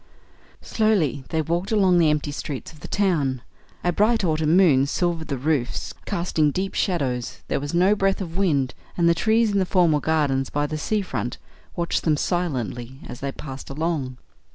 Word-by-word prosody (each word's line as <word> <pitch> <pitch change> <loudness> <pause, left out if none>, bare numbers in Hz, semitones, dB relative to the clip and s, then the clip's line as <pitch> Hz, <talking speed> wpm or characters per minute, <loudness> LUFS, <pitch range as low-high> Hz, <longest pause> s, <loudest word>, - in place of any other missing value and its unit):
Slowly 180 - +1
they 160 -1 0
walked 170 +6 -2
along 190 -5 +4
the 160 -2 +4
empty 150 -1 0
streets 145 -1 -5
of 155 - -16
the - - -9
town; 145 -11 0 0.4
a 175 - +1
bright 215 +4 +2
autumn 160 0 +2
moon 140 -8 +5
silvered 170 +1 -1
the 140 - -2
roofs, 140 -2 -1
casting 165 -3 +1
deep 190 +6 -2
shadows; 130 - -1
there - - 0
was 145 +4 -4
no 185 +4 +5
breath 195 -1 +1
of 170 -4 -5
wind; 145 -10 +1 0.2
and 170 -1 +3
the 170 - +6
trees 220 +5 +2
in 200 - +2
the - - +3
formal 175 -5 +3
gardens 145 -4 +1
by 145 0 0
the 155 - -3
sea 210 +5 0
front 120 - -4 0.4
watched 170 -1 -1
them 155 -2 +2
silently 130 - -2
as 125 - -8
they 140 0 -3
passed 135 -1 -8
along. 140 -3 -2
160 Hz, 180 wpm, -23 LUFS, 140-180 Hz, 0.4 s, the